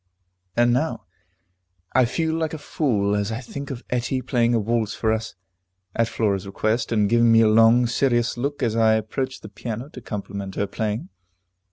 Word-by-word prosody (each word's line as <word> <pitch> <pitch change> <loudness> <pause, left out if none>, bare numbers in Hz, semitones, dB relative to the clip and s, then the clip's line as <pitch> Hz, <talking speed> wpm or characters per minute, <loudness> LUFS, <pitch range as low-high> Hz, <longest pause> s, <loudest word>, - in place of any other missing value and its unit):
And 120 0 +4
now 150 0 -1 0.9
I 130 -1 +5
feel 160 +6 -1
like 160 -1 -1
a - - -5
fool 110 -9 0
as 105 +1 -1
I 110 - -3
think 140 +3 -7
of 130 -3 -6
Etty 125 +1 -1
playing 120 -2 +2
a - - +3
waltz 110 0 -1
for 110 -1 +1
us, 110 -2 -4 0.6
at 115 -1 +2
Flora's 100 -4 -1
request, 110 +5 -1
and 105 -3 +3
giving 115 +1 +4
me 115 0 +6
a 110 - +5
long, 115 +3 +5
serious 120 0 +1
look 140 +4 -3
as 115 -2 +1
I 110 -1 +4
approached 130 +5 -3
the - - -7
piano 115 +5 -6
to 130 - -10
compliment 100 -2 -6
her 100 - 0
playing. 110 - -3
115 Hz, 185 wpm, -23 LUFS, 110-125 Hz, 0.9 s, me